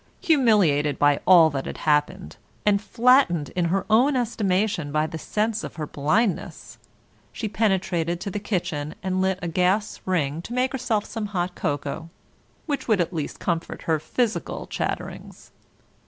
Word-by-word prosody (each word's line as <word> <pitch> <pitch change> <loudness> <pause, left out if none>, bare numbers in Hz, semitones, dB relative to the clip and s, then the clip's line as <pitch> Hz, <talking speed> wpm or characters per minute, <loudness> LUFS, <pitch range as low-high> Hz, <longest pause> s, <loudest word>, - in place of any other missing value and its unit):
Humiliated 200 - +3
by 145 -1 +3
all 170 -4 +7
that 135 -1 -4
had - - -6
happened, 150 +5 0 0.3
and 200 -1 +3
flattened 230 - +3
in 180 -2 -1
her 185 +3 0
own 250 +6 +4
estimation 200 - 0
by 155 +1 +1
the 160 0 -6
sense 215 +5 -1
of - - -7
her 155 - -4
blindness, 175 +9 -1 0.5
she 220 - -4
penetrated 180 -5 0
to 200 - -4
the 205 - -3
kitchen 175 -7 -3
and 185 0 0
lit 190 0 +1
a - - -1
gas 185 +5 0
ring 160 -4 0
to 230 - -8
make 255 +1 +1
herself 240 -5 -1
some 220 -2 -4
hot 175 +1 -1
cocoa, 145 +2 -3 0.6
which 285 -4 -3
would 215 -5 +3
at 175 +1 0
least 155 -3 -4
comfort 170 -2 -3
her 160 -2 +1
physical 230 +8 -2
chatterings. - - -5
185 Hz, 155 wpm, -24 LUFS, 160-220 Hz, 0.6 s, all